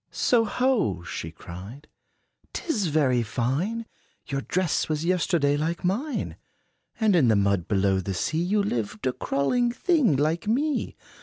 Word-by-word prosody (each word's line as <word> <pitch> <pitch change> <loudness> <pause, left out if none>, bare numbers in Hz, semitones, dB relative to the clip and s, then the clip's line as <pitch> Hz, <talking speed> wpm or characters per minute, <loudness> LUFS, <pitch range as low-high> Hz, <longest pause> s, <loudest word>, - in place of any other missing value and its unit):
"So 235 -2 +2
ho!" 215 - +1
she 80 -1 -5
cried, 95 - -10 0.7
"'t - - -4
is 215 - +1
very 140 -6 +2
fine! 140 - -1 0.4
Your 135 -1 -2
dress 180 +2 0
was 155 +1 -1
yesterday 170 -5 +2
like 165 +3 -2
mine; 250 +11 -2 0.6
And 215 -4 +3
in 150 -8 +4
the 110 - +4
mud 100 -3 +1
below 95 -1 +2
the 95 +1 -3
sea, 155 - -1
You 200 +4 +1
lived, 110 - -3
a 130 - +1
crawling 240 - 0
thing, 290 - +2
like 155 +7 0
me. 285 +7 0
155 Hz, 150 wpm, -26 LUFS, -, 0.7 s, in